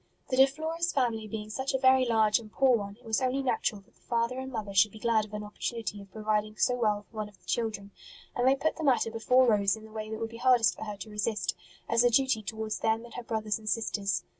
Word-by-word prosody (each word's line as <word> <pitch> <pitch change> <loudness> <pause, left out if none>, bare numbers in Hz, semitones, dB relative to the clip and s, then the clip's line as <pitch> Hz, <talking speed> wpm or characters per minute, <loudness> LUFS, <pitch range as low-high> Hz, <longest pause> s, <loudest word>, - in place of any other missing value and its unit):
The 255 - 0
De 265 +1 +8
Flores 320 +4 -2
family 230 -5 0
being 215 0 -6
such 265 +4 -2
a - - +4
very 260 -1 +5
large 220 -2 +3
and 215 -2 -12
poor 265 0 +4
one, 200 -2 -4
it 245 - -23
was 225 +3 0
only 260 +1 0
natural 220 -5 -1
that 195 - -29
the - - -31
father 235 +2 -1
and 265 0 -6
mother 210 -5 -5
should 205 +2 +5
be - - -12
glad 220 -1 +1
of 210 - -17
an 210 - -4
opportunity 210 -1 -4
of 200 -1 -15
providing 215 0 -1
so 250 - +3
well 210 -4 0
for 220 +3 -17
one 210 -1 -3
of 200 - -21
the 175 - -27
children; 210 -3 -2 0.4
and 245 +1 +2
they 265 - +5
put 315 +3 -1
the 325 - -4
matter 250 -5 +2
before 250 +3 +3
Rose 205 -4 +3
in 220 - -12
the 220 - -14
way 215 0 -5
that 220 - -4
would 225 0 -4
be 230 - -9
hardest 245 -2 +4
for - - -7
her 210 -1 -6
to 210 +2 -9
resist, 210 -2 -1 0.3
as 230 +1 +3
a 245 - +5
duty 260 -2 +2
towards 220 +1 -4
them 225 +1 0
and 235 - -13
her - - -5
brothers 220 -2 -2
and 215 -1 -5
sisters. 205 -4 -1
225 Hz, 265 wpm, -29 LUFS, 210-250 Hz, 0.4 s, De